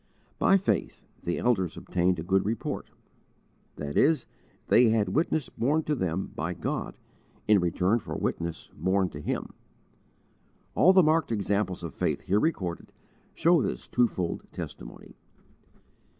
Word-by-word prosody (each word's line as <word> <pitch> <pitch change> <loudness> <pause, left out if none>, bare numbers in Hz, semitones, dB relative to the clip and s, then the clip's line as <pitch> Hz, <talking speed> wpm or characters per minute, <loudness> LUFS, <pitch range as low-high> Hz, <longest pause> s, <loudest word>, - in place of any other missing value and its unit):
By 195 - +5
faith 195 - -2 0.2
"the 85 - -2
elders 95 -9 0
obtained 90 0 0
a 80 - -4
good 95 +2 +2
report," 110 +2 -3 0.9
that 75 -1 -5
is, 155 +2 +3 0.4
they 120 -1 +5
had 110 -3 +2
witness 155 - 0
borne 145 +7 0
to 150 - -1
them 95 - -2
by 85 +2 -3
God - - -4 0.5
in 105 -2 +6
return 90 +5 +1
for - - -6
witness 85 -1 -3
borne 95 0 +1
to 75 - -8
Him. - - -3 1.2
All 185 - +6
the 190 -1 +6
marked 155 -3 +2
examples 100 -3 -1
of 85 - -5
faith - - -1
here 100 +3 +1
recorded 95 - -2 0.4
show 170 -2 +4
this - - -3
twofold 110 -8 0
testimony. - - -9
100 Hz, 135 wpm, -28 LUFS, 90-135 Hz, 1.2 s, in